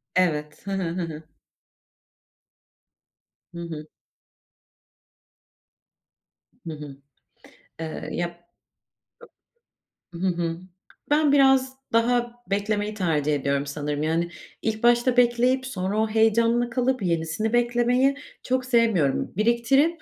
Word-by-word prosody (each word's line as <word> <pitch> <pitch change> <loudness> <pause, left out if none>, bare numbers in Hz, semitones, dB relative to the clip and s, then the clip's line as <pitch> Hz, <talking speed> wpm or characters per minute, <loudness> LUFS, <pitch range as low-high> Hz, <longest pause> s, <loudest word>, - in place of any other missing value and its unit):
Evet. 150 -1 0
Hı - - -2
hı. 195 -1 -1
Hı 175 +2 -2
hı. 160 -2 -6 2.3
Hı 170 - -8
hı. 155 -2 -7 2.8
Hı 160 - -4
hı. 145 -2 -9 0.8
Eee 160 -1 -5
ya. 175 0 -4 1.7
Hı 180 +3 -2
hı. 170 -2 -1 0.5
Ben 295 -1 +3
biraz 265 -2 +4 0.2
daha 240 +1 +2 0.2
beklemeyi 205 +1 -1
tercih 155 -7 0
ediyorum 140 0 -1
sanırım 145 +1 -3
yani 165 +2 0 0.3
ilk 220 0 -2
başta 240 +1 +4
bekleyip 245 +2 +3
sonra 195 -4 -3
o 220 - +2
heyecanla 230 +2 +3
kalıp 255 0 0
yenisini 170 +6 -1
beklemeyi 240 +3 +2 0.3
çok 255 0 0
sevmiyorum. 225 - +2
Biriktirip, 270 +9 +2
215 Hz, 100 wpm, -25 LUFS, 165-240 Hz, 2.8 s, biraz